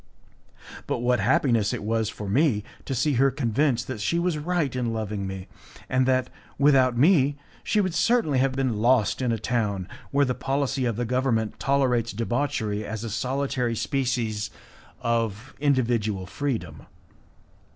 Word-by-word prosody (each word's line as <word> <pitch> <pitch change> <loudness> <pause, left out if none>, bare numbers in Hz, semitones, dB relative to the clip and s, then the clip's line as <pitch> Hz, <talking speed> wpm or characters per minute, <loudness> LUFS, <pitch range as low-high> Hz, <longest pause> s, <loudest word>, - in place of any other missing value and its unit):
But - - 0
what 125 -1 +2
happiness 115 -1 +2
it - - -4
was 110 0 0
for 105 -1 -7
me 115 -1 +2 0.2
to 135 - -2
see 140 +4 +1
her 135 - +5
convinced 125 -1 0
that 130 -5 -5
she 170 - +1
was 170 -1 +1
right 150 -3 -1
in 120 -2 -1
loving 105 -3 -3
me, 95 -1 -6 0.4
and 130 0 +2
that, 130 -1 +1 0.3
without 130 -4 +4
me, 145 -1 +4 0.3
she 215 - +1
would 185 -4 +1
certainly 180 - +2
have 135 0 +2
been 130 -4 0
lost 120 +1 +2
in 125 -2 +1
a 115 - 0
town 105 -5 -1 0.2
where 140 0 +3
the 130 - 0
policy 135 0 -1
of 115 -3 0
the 120 +2 -2
government 120 -3 0
tolerates 125 -5 +1
debauchery 115 -2 -1
as 110 +1 -5
a 115 - -4
solitary 125 0 -1
species 115 -5 -1 0.5
of 115 +1 -1
individual 120 -8 +1
freedom. 95 - -4
125 Hz, 155 wpm, -25 LUFS, 110-140 Hz, 0.5 s, her